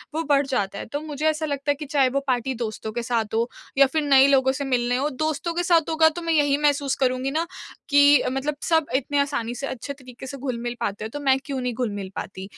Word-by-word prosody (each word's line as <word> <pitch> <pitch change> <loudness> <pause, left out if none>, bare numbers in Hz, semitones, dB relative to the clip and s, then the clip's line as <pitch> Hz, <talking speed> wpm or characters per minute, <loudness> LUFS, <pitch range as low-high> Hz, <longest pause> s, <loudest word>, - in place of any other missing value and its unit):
वो 325 - 0
बढ़ 285 -2 +2
जाता 200 -7 -2
है। - - -6
तो 290 +5 -5
मुझे 305 -1 -5
ऐसा 310 0 -1
लगता 285 0 -1
है - - 0
कि 300 +2 -7
चाहे 275 -2 +2
वो 275 - 0
पार्टी 255 +1 0
दोस्तों 220 0 -5
के 235 +1 -3
साथ 220 -2 0
हो 235 +2 +1 0.3
या 275 - +8
फिर 315 - +2
नए 275 -1 +6
लोगों 265 -1 +4
से 275 +2 -4
मिलने 245 -1 +1
हो, 285 +3 0
दोस्तों 315 +4 -2
के 350 - -1
साथ 335 -2 +3
होगा 320 0 +5
तो 345 +2 -7
मैं 330 -1 0
यही 290 -2 +3
महसूस 285 -2 +1
करूँगी 255 +1 0
ना 325 +3 -1 0.4
कि 285 0 +6
मतलब 280 +3 -2 0.2
सब 320 -1 +4
इतने 285 +2 0
आसानी 275 -5 -1
से 275 +3 -4
अच्छे 260 +2 -5
तरीके 260 -1 -12
से 275 - -7
घुल-मिल 240 -2 -4
पाते 205 +1 -2
हैं 220 - -6
तो 290 - -5
मैं 270 -2 +3
क्यों 270 -3 -3
नहीं 250 -1 -2
घुल-मिल 205 -5 -4
पाती? 190 -1 -6
275 Hz, 250 wpm, -24 LUFS, 250-295 Hz, 0.4 s, या